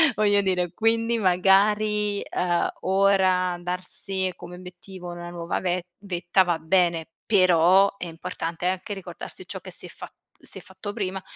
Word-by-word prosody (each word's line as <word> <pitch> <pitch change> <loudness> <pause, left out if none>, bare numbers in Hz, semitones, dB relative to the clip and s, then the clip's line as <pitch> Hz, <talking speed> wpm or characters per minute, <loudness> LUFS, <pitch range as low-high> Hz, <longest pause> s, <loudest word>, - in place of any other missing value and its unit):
voglio 205 -1 +3
dire. 180 -3 0
Quindi 230 +1 +1
magari, 205 +2 +3
uhm, 175 -1 +1
ora 190 -2 +3
darsi 185 +1 -3
come 180 0 -10
obiettivo 180 0 -10
una 175 0 -7
nuova 170 -1 -3
ve 180 -1 -1 0.2
vetta 180 -1 +1
va 175 -2 -1
bene, 170 -1 +1 0.2
però 185 0 +5
è 180 - -5
importante 165 0 -4
anche 190 +2 -2
ricordarsi 195 -2 -9
ciò - - -6
che - - -10
si - - -8
è - - -14
fa - - -9 0.3
si - - -12
è - - -13
fatto 190 +1 -8
prima, 190 -3 -3
185 Hz, 155 wpm, -25 LUFS, 175-200 Hz, 0.3 s, però